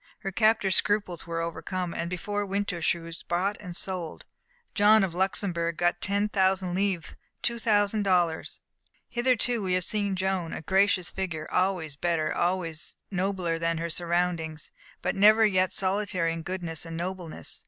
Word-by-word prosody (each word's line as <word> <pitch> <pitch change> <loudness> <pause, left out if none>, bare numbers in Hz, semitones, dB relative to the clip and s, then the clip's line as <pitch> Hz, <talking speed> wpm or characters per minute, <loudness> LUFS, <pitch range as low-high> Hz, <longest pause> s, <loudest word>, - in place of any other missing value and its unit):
Her 195 - -3
captors' 215 -1 +3
scruples 200 -5 0
were 165 0 -2
overcome, 175 +1 -3
and 170 - -3
before 205 +3 -2
winter 200 -3 -2
she 175 +2 +2
was 165 0 -8
bought 185 +4 -1
and 180 -4 -7
sold. 180 -4 -4 0.5
John 210 +1 +6
of 185 -3 -1
Luxembourg 175 -3 0
got 175 0 +1
ten 200 +1 +1
thousand 190 -2 +1
livres 190 -3 -1 0.3
two 235 0 0
thousand 210 -1 +2
dollars. 175 -5 +1 0.5
Hitherto 240 -1 +1
we 185 -2 -1
have 180 0 +2
seen 200 -1 0
Joan, 185 -3 -1
a - - -6
gracious 190 +1 +2
figure 170 -5 -4
always 180 -6 0
better 165 0 0
always 175 -2 -1
and 190 - -4
nobler 180 -3 0
than 165 0 0
her 170 +1 -3
surroundings 170 -2 -1 0.3
but - - 0
never 215 +3 +6
yet 185 -3 +2
solitary 190 -3 +1
in 165 - -5
goodness 170 -2 -4
and 165 -1 -6
nobleness. 180 -1 -5
185 Hz, 160 wpm, -27 LUFS, 170-200 Hz, 0.5 s, John